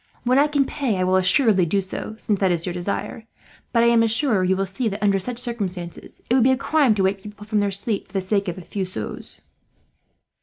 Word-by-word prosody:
When 250 +2 +3
I 290 - +4
can 285 -2 +1
pay 260 -7 -2
I 185 - 0
will 185 +1 +2
assuredly 190 0 +4
do 200 +5 +1
so, 195 +3 -5
since 210 -3 -1
that 190 - +2
is 170 -1 0
your 180 - -3
desire; 200 +5 -4 0.4
but 230 -1 +3
I - - +4
am 230 -1 +4
sure 225 -3 +1
you 185 +1 +2
will 195 +1 -1
see 195 +6 -2
that, 210 0 -4
under 200 -1 +3
such 240 +5 -5
circumstances, 195 -8 -5
it - - 0
would 255 -2 +4
be 260 - +4
a 260 - +2
crime 275 -5 +2
to 195 - 0
wake 190 +1 0
people 210 +1 -11
from 210 0 0
their 205 0 +1
sleep 200 +2 -2
for - - -25
the 195 - 0
sake 200 +1 0
of 175 - -4
a - - -7
few 195 +3 -4
sous." 180 - -7
205 Hz, 250 wpm, -22 LUFS, 190-235 Hz, 0.4 s, I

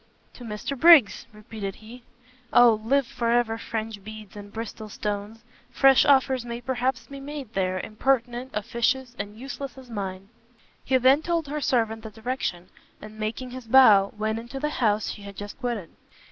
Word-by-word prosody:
"To 245 - -12
Mr 220 +4 -4
Briggs!" 300 - +6
repeated 210 -2 -7
he, 230 +3 -13 0.5
"O 230 -3 +6
live 275 +4 +2
for 235 -1 -3
ever 235 -1 +1
French 220 -3 -5
beads 215 -1 -10
and 205 0 -10
Bristol 220 -1 -7
stones! 210 +2 -5 0.3
fresh 270 -1 +5
offers 265 -2 +3
may 235 0 -5
perhaps 255 0 -2
be 275 0 -10
made 275 -4 -8
there, 185 -1 0
impertinent, 245 +3 -1
officious, 240 +4 -1
and 205 +1 -6
useless 270 +1 -7
as 255 -2 -13
mine!" 195 -2 -5 0.5
He 260 - +2
then 260 +4 +5
told 335 -3 -1
her 300 +1 -3
servant 225 -4 0
the 220 - -8
direction, 220 -5 -4 0.3
and, 215 0 -12
making 230 +4 -4
his 255 -2 -9
bow, 215 -6 +6
went 220 +1 -1
into 240 +4 -7
the 300 +2 -1
house 215 -5 +1
she 210 - -9
had 200 0 -10
just 205 +4 -8
quitted. 235 -10 -4
230 Hz, 170 wpm, -25 LUFS, 215-260 Hz, 0.5 s, Briggs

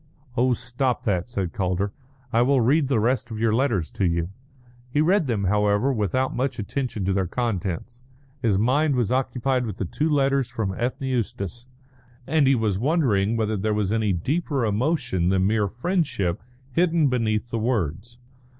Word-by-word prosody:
"Oh, 125 +1 +3
stop 125 +1 -1
that," 100 -3 -1
said 95 -7 -3
Calder; 95 +1 -1 0.4
"I 115 - +4
will 135 +2 +3
read 135 +5 +3
the 130 -4 +2
rest 125 +2 0
of 110 - -5
your 110 0 +1
letters 110 - +1
to 100 - -1
you." 85 0 -1 0.6
He 145 - 0
read 175 +1 +3
them, 110 -5 0
however, 105 +6 +2
without 125 +4 0
much 130 0 -1
attention 115 -2 -3
to 95 - +1
their 95 -1 0
contents. 115 +1 -3 0.4
His 110 -6 +2
mind 135 +7 +2
was 120 -4 0
occupied 130 -1 0
with 105 -3 -5
the - - -2
two 150 - -1
letters 140 -3 +2
from 110 -6 -2
Ethne 125 +4 -2
Eustace, 120 -2 -3 0.6
and 150 -1 +3
he 135 - +5
was 105 -5 0
wondering 115 - +2
whether 110 -1 0
there 105 +1 0
was 105 -1 0
any 110 -2 +1
deeper 135 - -1
emotion 115 - 0
than 95 0 +2
mere 105 0 +2
friendship 125 - -1 0.3
hidden 165 +1 +2
beneath 115 -3 0
the 115 - -1
words. 110 - -2
115 Hz, 170 wpm, -24 LUFS, 100-130 Hz, 0.6 s, he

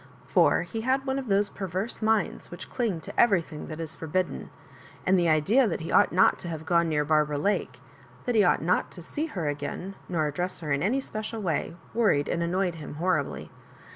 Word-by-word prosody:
For - - +3
he 225 - -5
had 265 +3 +1
one 265 0 -1
of 265 - -6
those 200 0 +3
perverse 195 +4 -1
minds 220 -3 0
which 175 - -9
cling 215 -10 -1
to - - -7
everything 170 -9 +2
that 155 0 -7
is 165 -1 -3
forbid 180 +4 -1
den; - - -8 0.6
and 190 - +4
the 170 -1 +2
idea 195 - +4
that 175 - -2
he 160 - -5
ought - - +5
not 185 +2 +4
to - - -5
have 160 -2 -5
gone 170 0 +2
near 150 -1 +1
Barbara 150 -1 +2
Lake, 200 +8 -1 0.5
that 245 - 0
he 215 -3 +5
ought 180 - +3
not 180 +2 +1
to 175 - -10
see 300 - -3
her 180 - -3
again, 145 +6 -4 0.2
nor 160 -4 0
address 175 +6 -3
her 150 -3 -4
in 140 0 +1
any 250 +8 +1
special 220 -2 -5
way, 170 -4 -2 0.2
worried 205 -11 +2
and 170 - -1
annoyed 180 +1 0
him 155 -3 -8
horribly. 180 +4 -1
180 Hz, 210 wpm, -27 LUFS, 160-215 Hz, 0.6 s, ought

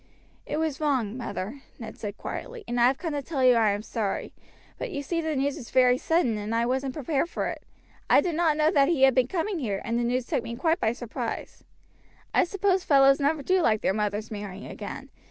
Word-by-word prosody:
"It - - -2
was 315 -2 -2
wrong, 255 -8 0
mother," 225 0 -5 0.2
Ned 230 - -8
said 205 -1 -6
quietly, 480 -2 -6
"and 240 - -1
I 240 - +7
have 265 +1 +1
come 330 -1 -4
to 290 - -1
tell 275 -1 -2
you 255 -1 +7
I 225 -3 +4
am 205 +1 -1
sorry; 220 -3 -3 0.5
but - - -3
you 285 -8 -4
see 335 +4 -1
the 315 -1 -2
news 275 +2 0
was 245 -6 -9
very 255 -1 +4
sudden, 290 -10 +1
and 210 +2 -3
I 230 +1 +2
wasn't 260 +1 -1
prepared 300 +2 -1
for - - -2
it. - - -6 0.5
I - - +7
did 350 - 0
not 320 -2 +2
know 310 +1 +3
that 280 -6 +4
he 310 -6 +2
had 265 -1 +7
been 255 -1 +3
coming 365 +4 -2
here, 205 -8 -2
and 235 0 0
the - - 0
news 245 +1 0
took - - -1
me 235 - -5
quite 325 +6 +1
by 220 - +2
surprise. 240 -2 -6 0.7
I - - +4
suppose 385 0 +1
fellows 275 -3 +5
never 290 +1 +1
do 370 +5 +2
like 215 -8 +2
their - - +1
mothers 210 +1 -2
marrying 205 -2 -6
again. - - -8
265 Hz, 230 wpm, -26 LUFS, 230-315 Hz, 0.7 s, I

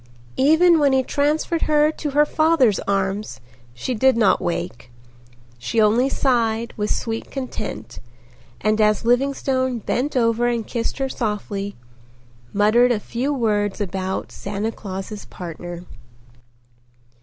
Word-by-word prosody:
Even 320 +5 +5
when 285 -2 +3
he 265 0 +3
transferred 300 +5 0
her 300 0 +4
to 310 -1 -4
her 295 +2 +4
father's 310 - +3
arms 195 - -1 0.4
she 255 - -3
did 260 +1 +3
not 210 -4 +3
wake. 170 -8 -4 0.7
She 225 - -1
only 225 +5 +4
sighed 235 -4 0
with 210 -1 -2
sweet 225 -1 -3
content 180 - -6 0.6
and 215 +1 +1
as 215 +1 +2
Livingstone 260 0 +1
bent 255 +5 -2
over 230 0 +2
and 235 -2 -1
kissed 230 +1 -3
her 270 -1 -1
softly, 205 -4 -3 0.8
muttered 215 +5 +4
a 225 - +1
few 245 +7 -3
words 210 -7 0
about 190 -1 -3
"Santa 205 +2 -3
Claus's 195 0 -7
partner." 175 0 -8
230 Hz, 125 wpm, -21 LUFS, 205-265 Hz, 0.8 s, Even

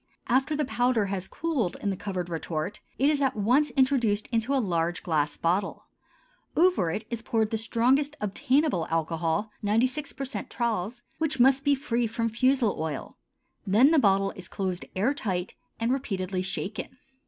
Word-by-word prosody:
After 265 +5 +2
the 300 - 0
powder 245 -4 +1
has 190 -1 -3
cooled 290 - -2
in 200 - -1
the - - -2
covered 185 -2 -4
retort, 165 +3 -3 0.2
it 270 - +3
is 295 -1 +2
at 270 -1 +1
once 250 +8 +3
introduced 245 -6 +3
into 230 +2 0
a - - +3
large 175 -7 0
glass 150 -3 0
bottle; 185 +4 -1 0.7
over 345 - +4
it 215 +7 -3
is 235 -1 -3
poured 220 -2 0
the 225 - +1
strongest 260 +6 +2
obtainable 255 - +1
alcohol 165 +5 -1
(96% 255 +5 -1
Tralles) 235 0 -2 0.2
which 315 -4 0
must 265 +2 +5
be 285 -1 +4
free 240 -3 -1
from 230 +1 -1
fusel 255 -1 +2
oil; 155 -3 -4 0.5
then 230 +10 +5
the 320 - +5
bottle 195 -3 +3
is 185 -1 -10
closed 185 -2 -3
air 215 +9 +2
tight 190 -9 -3 0.3
and 230 +2 +1
repeatedly 190 -8 -2
shaken. 200 +6 -4
225 Hz, 160 wpm, -27 LUFS, 185-265 Hz, 0.7 s, must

